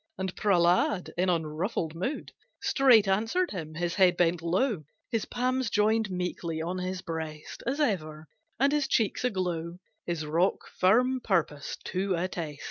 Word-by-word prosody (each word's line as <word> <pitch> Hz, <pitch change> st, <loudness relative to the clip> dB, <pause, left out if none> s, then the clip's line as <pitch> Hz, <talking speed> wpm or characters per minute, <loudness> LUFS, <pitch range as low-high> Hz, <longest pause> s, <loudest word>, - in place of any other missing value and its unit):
And 190 Hz, -1 st, -3 dB
Prehlad, 180 Hz, -1 st, +2 dB
in 180 Hz, +1 st, +1 dB
unruffled 160 Hz, 0 st, -1 dB
mood 190 Hz, -, -4 dB, 0.3 s
Straight 255 Hz, -7 st, +5 dB
answered 225 Hz, -, +1 dB
him; 155 Hz, -5 st, -6 dB
his 170 Hz, +1 st, -1 dB
head 185 Hz, -2 st, +4 dB
bent 175 Hz, -1 st, +2 dB
low, 185 Hz, -, 0 dB, 0.3 s
His 225 Hz, -3 st, 0 dB
palms 255 Hz, 0 st, -1 dB
joined 215 Hz, 0 st, +2 dB
meekly 180 Hz, -3 st, -3 dB
on 175 Hz, +3 st, -3 dB
his 185 Hz, +1 st, -4 dB
breast 160 Hz, -2 st, -6 dB
As 275 Hz, +4 st, -1 dB
ever, 160 Hz, -, -1 dB, 0.3 s
and 275 Hz, +2 st, +3 dB
his 295 Hz, -2 st, +1 dB
cheeks 220 Hz, -1 st, +1 dB
aglow 175 Hz, -7 st, -2 dB, 0.3 s
His 170 Hz, -3 st, -2 dB
rock 165 Hz, +5 st, +1 dB
firm 250 Hz, +8 st, +4 dB
purpose 165 Hz, -9 st, -1 dB
to 190 Hz, 0 st, -1 dB
attest. 170 Hz, -4 st, -4 dB
185 Hz, 145 wpm, -28 LUFS, 165-220 Hz, 0.3 s, Straight